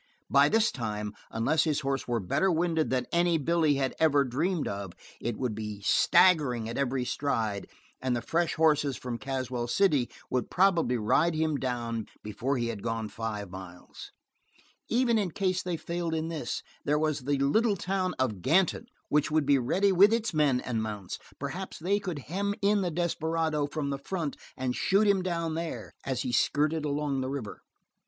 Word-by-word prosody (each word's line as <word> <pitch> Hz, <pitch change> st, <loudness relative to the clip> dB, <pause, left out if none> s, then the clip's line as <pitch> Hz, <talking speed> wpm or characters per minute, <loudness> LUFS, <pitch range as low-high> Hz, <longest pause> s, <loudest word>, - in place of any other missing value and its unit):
By -, -, +6 dB
this 225 Hz, +1 st, +3 dB
time, 105 Hz, -4 st, -4 dB, 0.2 s
unless 145 Hz, +8 st, +1 dB
his 155 Hz, -2 st, 0 dB
horse 135 Hz, -1 st, -2 dB
were 120 Hz, -1 st, 0 dB
better 145 Hz, -, +1 dB
winded 165 Hz, -1 st, +1 dB
than 130 Hz, -1 st, 0 dB
any 170 Hz, -1 st, +3 dB
that 145 Hz, -, -6 dB
Billy 165 Hz, -3 st, +3 dB
had 135 Hz, -1 st, 0 dB
ever 145 Hz, -3 st, +4 dB
dreamed 155 Hz, +7 st, -1 dB
of, 100 Hz, -3 st, -5 dB, 0.3 s
it 120 Hz, -2 st, -3 dB
would 125 Hz, -4 st, -1 dB
be 105 Hz, -1 st, -5 dB
staggering 125 Hz, -, +4 dB
at 115 Hz, -, -5 dB
every 130 Hz, -2 st, 0 dB
stride, 110 Hz, -8 st, -1 dB, 0.3 s
and 130 Hz, -1 st, 0 dB
the 120 Hz, -, -2 dB
fresh 170 Hz, 0 st, 0 dB
horses 150 Hz, -4 st, +2 dB
from 120 Hz, -2 st, -5 dB
Caswell 130 Hz, -3 st, -3 dB
City 145 Hz, -3 st, +2 dB, 0.2 s
would 125 Hz, -1 st, -1 dB
probably 175 Hz, -10 st, +3 dB
ride 130 Hz, +10 st, +2 dB
him 155 Hz, -1 st, +1 dB
down 120 Hz, -4 st, -3 dB, 0.2 s
before 120 Hz, +6 st, -2 dB
he 120 Hz, -1 st, -1 dB
had 110 Hz, -3 st, -5 dB
gone 115 Hz, -1 st, -3 dB
five 105 Hz, -4 st, -5 dB
miles. 95 Hz, -2 st, -10 dB, 0.8 s
Even 235 Hz, -1 st, +3 dB
in 195 Hz, -3 st, 0 dB
case 185 Hz, +1 st, 0 dB
they 180 Hz, -2 st, -3 dB
failed 170 Hz, 0 st, -3 dB
in 160 Hz, +1 st, -2 dB
this, 150 Hz, -7 st, -4 dB, 0.2 s
there 150 Hz, +1 st, +2 dB
was 155 Hz, -1 st, 0 dB
the 140 Hz, +2 st, -1 dB
little 205 Hz, -, +2 dB
town 185 Hz, +1 st, -1 dB
of 110 Hz, -8 st, -1 dB
Ganton, 190 Hz, -, +2 dB, 0.2 s
which 150 Hz, -1 st, +2 dB
would 155 Hz, -1 st, +2 dB
be 140 Hz, -1 st, +4 dB
ready 190 Hz, +11 st, +2 dB
with 195 Hz, +3 st, +6 dB
its 230 Hz, -2 st, 0 dB
men 145 Hz, -5 st, +2 dB
and 115 Hz, -3 st, -2 dB
mounts. 105 Hz, -4 st, -5 dB, 0.2 s
Perhaps 170 Hz, +8 st, -5 dB
they 195 Hz, +5 st, +1 dB
could 180 Hz, -6 st, -4 dB
hem 200 Hz, +4 st, -1 dB
in 205 Hz, 0 st, +3 dB
the 180 Hz, -, 0 dB
desperado 160 Hz, -2 st, 0 dB
from 145 Hz, -1 st, -3 dB
the 140 Hz, -, -3 dB
front 155 Hz, 0 st, -3 dB, 0.2 s
and 130 Hz, -1 st, -1 dB
shoot 200 Hz, +3 st, +3 dB
him 200 Hz, -2 st, +3 dB
down 170 Hz, -3 st, -2 dB
there, 165 Hz, 0 st, -4 dB
as 130 Hz, -2 st, -2 dB
he 125 Hz, -, -2 dB
skirted 150 Hz, +5 st, +1 dB
along 145 Hz, -2 st, -1 dB
the 130 Hz, -, -2 dB
river. 135 Hz, -7 st, -5 dB
145 Hz, 185 wpm, -29 LUFS, 120-170 Hz, 0.8 s, By